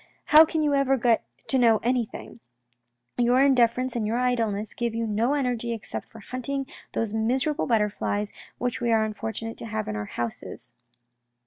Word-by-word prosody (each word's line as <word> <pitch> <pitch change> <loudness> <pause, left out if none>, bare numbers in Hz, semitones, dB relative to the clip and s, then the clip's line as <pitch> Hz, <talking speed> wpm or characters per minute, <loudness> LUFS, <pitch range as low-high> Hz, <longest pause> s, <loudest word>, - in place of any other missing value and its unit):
How 310 +1 +8
can 315 0 -1
you 295 -1 +2
ever 275 -1 +3
get 235 -2 +2 0.3
to 265 - +3
know 230 -3 +5
any 245 0 +2
thing? - - -10 0.8
Your 245 +1 +4
indifference 255 -2 +3
and 220 -3 -1
your 225 +2 0
idleness 225 -4 0
give 235 -2 -2
you 230 0 -1
no 225 +6 +1
energy 245 -4 -1
except 225 - -6
for 225 - -14
hunting 255 +4 -3 0.3
those 225 -2 -1
miserable 260 +8 0
butterflies, 210 -2 0 0.2
which 245 +1 -2
we 235 -1 +1
are 220 -1 +3
unfortunate 225 +1 -5
to - - -6
have 215 -1 -3
in 105 - -3
our 105 0 -3
houses." 115 +2 -5
235 Hz, 175 wpm, -26 LUFS, 220-255 Hz, 0.8 s, How